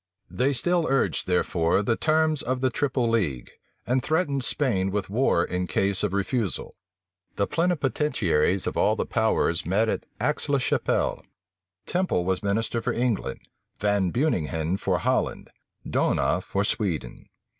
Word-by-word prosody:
They 130 +3 +1
still 170 +5 +2
urged, 135 0 +1
therefore, 90 +1 +1
the 115 +3 +1
terms 155 0 +2
of 130 0 -2
the 130 -1 +2
triple 130 -2 0
league, 90 - -1 0.3
and 125 +2 +1
threatened 150 -3 0
Spain 105 -10 0
with 100 -1 -3
war 105 -7 +2
in 90 0 -2
case 95 +1 +1
of 105 - 0
refusal. 100 +1 -2 0.6
The 100 - +1
plenipotentiaries 135 - +1
of - - -2
all - - +3
the - - -2
powers 80 0 +1
met 105 +6 +1
at - - -3
Aix 150 +5 -1
la 140 - +3
Chapelle. 125 - 0 0.6
Temple 180 - 0
was 95 0 0
minister 110 +3 -1
for - - -1
England; 120 -3 -1 0.4
Van 100 -2 +1
Beuninghen 85 - 0
for - - 0
Holland; - - -1 0.4
D'Ohna - - +1
for 100 - -1
Sweden. 100 -7 -2
110 Hz, 145 wpm, -25 LUFS, 95-135 Hz, 0.6 s, all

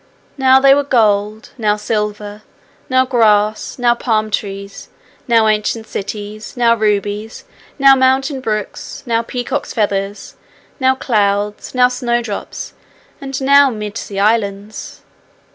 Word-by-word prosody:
Now 265 -1 +5
they 275 0 +6
were 285 - +3
gold, 215 -4 +1
now 210 -2 +2
silver, 210 -1 -3 0.5
now 260 0 +3
grass, 215 -4 +1
now 245 -1 +3
palm 220 -3 -1
trees, 200 -1 -5 0.4
now 230 -2 +4
ancient 215 +1 0
cities, 210 +2 -7
now 235 -1 +4
rubies, 210 - -2 0.3
now 275 -1 +7
mountain 265 +1 +1
brooks, 215 -4 -4
now 230 -2 +1
peacock's 245 +1 -4
feathers, 200 -2 -2 0.4
now 260 0 +3
clouds, 210 -3 -1
now 250 0 +5
snowdrops, 240 -4 -3 0.5
and 270 -1 -4
now 280 +1 +6
mid 210 -3 -6
sea 200 -3 -6
islands. 205 0 -1
220 Hz, 120 wpm, -16 LUFS, 210-255 Hz, 0.5 s, now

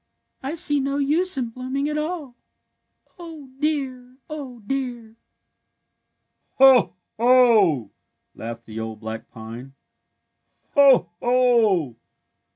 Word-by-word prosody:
I 275 +5 -4
see 290 -3 +2
no 275 +1 -2
use 305 +4 +1
in 245 -3 -2
blooming 260 +4 -4
at 300 - -3
aU. 300 -3 -4 0.9
Oh, 320 -6 -11
dear! 260 -4 -3
Oh, 270 -6 -7
dear! 240 -3 -4 0.7
" - - -49
Ho! 265 -7 +6 0.2
Ho! 225 - +4 0.2
" - - -50
laughed 115 +1 -8
the 110 0 -8
old 110 -1 -6
black 110 +1 -7
pine. 115 +4 -10 0.9
'^ - - -41
Ho! 270 - +5
Ho! 230 - +2
255 Hz, 115 wpm, -22 LUFS, 175-280 Hz, 0.9 s, Ho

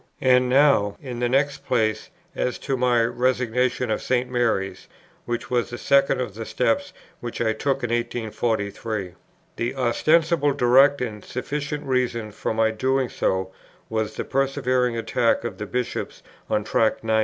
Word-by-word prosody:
And 125 -1 +4
now, 130 -7 +4
in 125 -4 -6
the 120 0 +1
next 140 +2 +1
place, 110 -3 0 0.3
as 125 - -1
to 135 - -2
my 120 -2 +3
Resignation 125 0 0
of 110 - -1
St. 125 0 0
Mary's, 100 -6 -1 0.4
which 120 +1 -4
was 120 -2 +1
the 120 - -6
second 140 +2 +3
of 120 -5 -3
the 115 +2 -6
steps 125 +12 0 0.3
which 120 -1 -6
I 110 -2 +1
took 135 +4 -1
in 120 - -1
1843. 110 -4 -2 0.4
The 120 +3 -2
ostensible, 145 +4 +2
direct, 135 +3 +5
and 110 -4 -4
sufficient 145 +3 -4
reason 120 -4 -1
for - - -3
my 110 0 +2
doing 130 +3 0
so 95 0 -1 0.4
was 110 -1 -2
the - - -3
persevering 130 -3 0
attack 115 - +1
of - - -5
the - - -4
Bishops 125 -1 -4 0.3
on 105 -1 +1
Tract 110 +2 +1
90. 110 0 +2
120 Hz, 155 wpm, -24 LUFS, 110-130 Hz, 0.4 s, direct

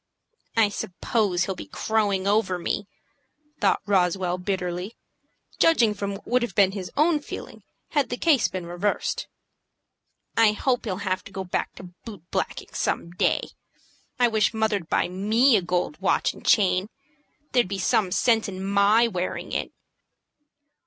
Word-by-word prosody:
"I 220 -2 +5
suppose 190 -1 -1
he'll 190 - -2
be - - -9
crowing 205 -4 0
over 200 -2 +2
me," 185 +3 -3 0.7
thought 200 -3 +2
Roswell, 180 -2 +1
bitterly, 180 +1 -3 0.6
judging 240 -10 +4
from 200 -1 -4
what 195 - -12
would 250 +1 +2
have 235 -5 -3
been 195 -2 +5
his 190 -2 -6
own 310 +1 +3
feeling 290 - -9 0.3
had 290 -4 +1
the 245 - -3
case 295 -6 +3
been 185 -2 -5
reversed. 175 +4 -2 1.1
"I 225 -2 +5
hope 245 +3 0
he'll 190 -4 -2
have 185 -1 -1
to - - -11
go 190 0 -4
back 180 - -3
to 180 -1 -11
boot 205 -8 -9
blacking - - -3
some 170 - -2
day. 175 - 0 0.7
I 245 - +4
wish 220 -1 +1
mother'd 210 -6 0
buy - - +2
me 215 +8 +3
a 200 - +3
gold 175 -2 -2
watch 195 - +1
and - - -14
chain. 195 -1 +3 0.6
There'd 245 -6 +3
be 195 +1 -3
some 190 0 +1
sense 225 +3 +2
in 190 -1 -6
my 200 +4 +4
wearing 185 -4 -4
it." - - -2
200 Hz, 155 wpm, -25 LUFS, 185-220 Hz, 1.1 s, I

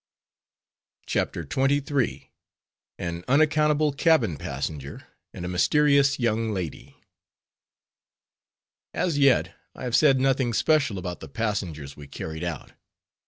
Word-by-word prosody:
CHAPTER - - -1
XXIII. 140 0 0 0.7
AN 85 0 -5
UNACCOUNTABLE 150 +1 +3
CABIN 135 - +2
PASSENGER, 70 0 -5 0.3
AND 90 - -7
A - - -3
MYSTERIOUS 140 +9 +3
YOUNG 115 -2 0
LADY 90 -5 -6 2.0
As 165 -5 0
yet, 140 -3 +3 0.2
I - - -9
have 125 -2 0
said 135 -4 +5
nothing 130 -2 +1
special 140 -4 +2
about 90 -2 -5
the 80 - -10
passengers 85 -7 -3
we 75 -1 -11
carried 80 +3 -6
out. 85 -4 -5
120 Hz, 110 wpm, -25 LUFS, 85-140 Hz, 2.0 s, said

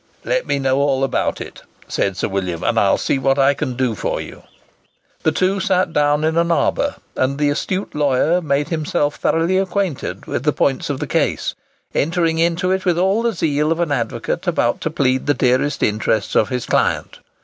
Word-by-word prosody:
"Let - - 0
me - - +1
know 135 0 +1
all 135 -1 +1
about 135 - 0
it," - - -9 0.3
said 95 -1 -1
Sir - - -1
William, 90 -4 -3
"and - - +2
I'll - - +3
see 135 - 0
what 135 +1 +2
I 135 0 +4
can 130 -2 -3
do 125 -2 0
for - - -2
you." - - -9 0.8
The 160 - +2
two 185 +4 +1
sat 185 -4 +1
down 150 0 +2
in 160 +1 +1
an 170 0 +2
arbour, 280 +11 +1 0.2
and 135 +2 0
the 145 -1 +2
astute 185 +6 -3
lawyer 150 +4 +2
made 145 -1 0
himself 150 -2 -1
thoroughly 170 +4 +1
acquainted 185 - -2
with - - -3
the 150 +2 +1
points 135 +1 0
of 140 -2 -2
the - - -2
case; - - 0 0.4
entering 165 +1 +1
into 170 +2 +1
it 190 0 0
with 175 -3 +1
all 190 +5 +2
the 235 -1 0
zeal 150 -3 0
of 165 - 0
an 170 -4 0
advocate 120 -5 -2
about - - +1
to - - -1
plead 130 -1 0
the 145 - +3
dearest 130 +3 +1
interests 110 +1 0
of 110 - +3
his 125 -2 -2
client. - - 0
150 Hz, 200 wpm, -19 LUFS, 135-170 Hz, 0.8 s, I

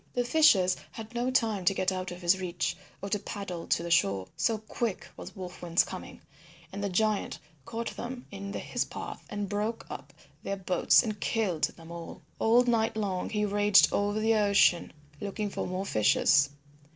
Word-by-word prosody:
The 245 - +2
fishers 215 -11 +5 0.2
had 225 +1 -9
no 240 +1 0
time 225 -6 +1
to 195 - +3
get 185 0 +1
out 185 -1 -3
of 180 0 -9
his 175 +2 +3
reach 175 -2 -2 0.3
or 200 - -3
to 210 - 0
paddle 195 -4 -6
to 170 - +1
the 170 - -4
shore, 100 - +2
so 220 +6 +1
quick 220 -1 -4
was - - -10
Wolf 180 -2 -8
Wind's 170 -1 +3
coming, - - -9 0.5
and 200 +1 -4
the 200 - 0
giant 215 +2 0 0.3
caught 230 0 -4
them 245 +1 -6
in 200 0 -6
his - - -2
path - - -8
and 205 -1 -3
broke 210 +3 -2
up - - -8 0.3
their 200 - -3
boats 185 +4 +4
and 215 -3 -4
killed 195 -10 0
them 165 0 -10
all. 170 -1 -8 0.2
All 235 +2 +5
night 225 -3 +1
long 195 -4 -2
he 210 -1 0
raged 205 0 +5
over 205 +1 +1
the 220 +1 +3
ocean 200 -4 +3 0.3
looking 205 0 -3
for - - -3
more 185 +2 -3
fishers. 140 - +4
200 Hz, 185 wpm, -29 LUFS, 180-220 Hz, 0.5 s, fishers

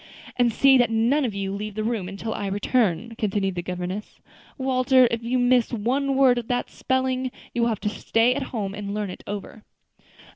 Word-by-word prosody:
"And 245 -1 +3
see 270 +3 +5
that 240 -2 +3
none 235 +6 +2
of 220 -5 -3
you 195 -1 -3
leave 210 0 -5
the 215 - -2
room 215 -5 -2
until 205 +3 -5
I 200 - -3
return," 205 0 0
continued 195 -2 0
the 175 - -3
governess. 180 +3 -5 0.4
"Walter, 260 -1 +4
if 230 0 -1
you 245 +2 0
miss 245 -1 +3
one 260 +5 0
word 260 -2 +5
of 230 - -8
that 245 0 -2
spelling, 260 0 -1 0.2
you 240 - -1
will 235 - +3
have 215 -3 -3
to 210 - 0
stay 225 +3 +2
at 280 - -3
home 200 -5 -3
and 205 0 -5
learn 210 -3 -2
it - - -10
over." 205 +1 -7
230 Hz, 205 wpm, -24 LUFS, 200-255 Hz, 0.4 s, see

